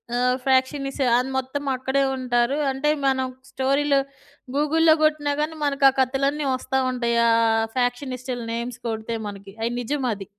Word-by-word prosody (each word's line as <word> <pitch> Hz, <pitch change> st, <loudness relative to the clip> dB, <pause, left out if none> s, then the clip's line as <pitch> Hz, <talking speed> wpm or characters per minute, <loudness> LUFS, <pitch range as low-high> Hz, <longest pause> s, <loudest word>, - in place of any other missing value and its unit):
ఆహ్, 250 Hz, +1 st, +2 dB
ఫ్యాక్షనిసు 275 Hz, +1 st, +1 dB
అది 250 Hz, +2 st, -1 dB
మొత్తమక్కడే 265 Hz, 0 st, -1 dB
ఉంటారు. 250 Hz, +1 st, 0 dB
అంటే 270 Hz, +3 st, 0 dB, 0.2 s
మనం 260 Hz, -1 st, +1 dB, 0.2 s
స్టోరీలు 275 Hz, +1 st, +2 dB, 0.6 s
గూగుల్‌లో 315 Hz, +2 st, +4 dB
గొట్టినా 300 Hz, -2 st, +2 dB
గానీ 315 Hz, +1 st, -2 dB
మనకా 280 Hz, -1 st, +4 dB
కతలన్నీ 275 Hz, +3 st, +1 dB
వస్తా 265 Hz, +1 st, -1 dB
ఉంటాయి. 235 Hz, -2 st, 0 dB
ఆహ్, 225 Hz, -1 st, +3 dB
ఫ్యాక్షనిస్టుల 250 Hz, 0 st, -2 dB
నేమ్స్ 235 Hz, +1 st, -4 dB
కొడితే 220 Hz, 0 st, -3 dB
మనకి 200 Hz, -1 st, -11 dB
అయి 235 Hz, -, -1 dB
నిజమది. 240 Hz, -6 st, -2 dB
260 Hz, 125 wpm, -23 LUFS, 245-280 Hz, 0.6 s, గూగుల్‌లో